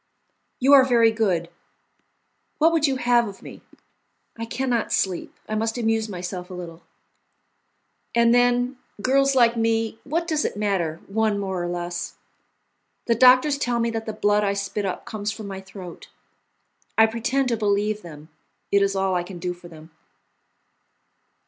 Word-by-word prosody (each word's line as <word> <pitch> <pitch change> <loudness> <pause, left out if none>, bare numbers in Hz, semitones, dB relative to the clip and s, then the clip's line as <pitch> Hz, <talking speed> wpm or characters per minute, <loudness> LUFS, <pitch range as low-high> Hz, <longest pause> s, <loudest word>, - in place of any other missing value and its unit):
"You 270 +3 +4
are 275 -2 +9
very 235 -3 +4
good! 190 -7 0 1.1
What 320 +2 +4
would 320 -2 +2
you 270 - 0
have 240 -2 +2
of 195 -1 -10
me? - - -11 0.7
I 230 - -5
can 255 +4 -3
not 235 -3 0
sleep. 185 -3 -1
I 215 - -4
must 225 +2 -1
amuse 225 -2 0
myself 180 -1 -6
a 185 - -7
little. 170 -2 -8 1.3
And 235 0 +4
then, 245 +1 +2 0.2
girls 275 +4 +2
like 240 -2 +4
me, 225 -1 0
what 335 +4 -2
does 310 -3 0
it - - -3
matter, 185 -6 -1
one 215 0 0
more 190 -3 -3
or - - -2
less? 175 0 -4 0.9
The 235 - +3
doctors 255 +4 +5
tell 245 -3 0
me 230 0 0
that 225 0 -4
the - - -1
blood 210 0 +2
I 200 -1 +1
spit 200 +1 -3
up 185 - -5
comes 210 -1 -4
from 215 0 -8
my 195 -1 -6
throat; 190 -2 -11 0.9
I 220 - +7
pretend 245 +4 -1
to 235 - +1
believe 210 0 0
them; 155 -3 -12 0.4
it 200 - +4
is 200 0 +1
all 190 -1 0
I 180 - +1
can 175 +1 -9
do 180 +1 -3
for 175 0 -14
them." 160 -1 -14
220 Hz, 170 wpm, -23 LUFS, 190-240 Hz, 1.3 s, are